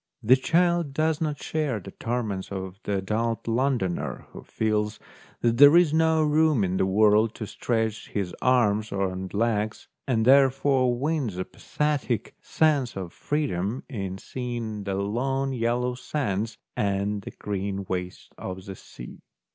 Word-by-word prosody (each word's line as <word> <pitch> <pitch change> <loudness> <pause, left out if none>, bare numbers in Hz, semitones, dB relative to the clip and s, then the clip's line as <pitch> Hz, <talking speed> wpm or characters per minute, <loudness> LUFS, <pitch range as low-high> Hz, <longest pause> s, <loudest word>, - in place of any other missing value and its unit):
The 120 +4 +7
child 170 +1 +1
does 160 +1 +1
not 150 -2 -1
share 150 -8 -1
the 95 0 -10
torments 110 -6 -3
of 95 0 -6
the 100 - 0
adult 110 +5 -2
Londoner, 115 -6 -1
who - - -9
feels 105 -1 -1 0.4
that 115 -1 +2
there 145 +5 +9
is 170 -4 +4
no 160 0 +3
room 150 -5 +3
in 95 0 0
the 95 - +2
world 105 +3 +4
to 110 - -5
stretch 110 0 -2
his 95 -4 -3
arms 110 -4 +2
and 95 -1 -2
legs, 110 0 -1 0.2
and 115 -4 +1
therefore 135 -1 +4
wins 140 - -1
a 95 - -2
pathetic 145 -6 -2
sense 145 -8 +1
of 90 -3 -5
freedom 130 -6 -2
in 95 -8 -4
seeing 115 -3 -5
the 100 -1 -2
long 135 +7 -1
yellow 120 +1 0
sands 115 -5 -2 0.2
and 100 0 0
the - - -8
green 100 -1 -4
wastes 90 -1 -4
of 95 0 -6
the 95 -2 -7
sea. - - -11
115 Hz, 145 wpm, -26 LUFS, 100-135 Hz, 0.4 s, there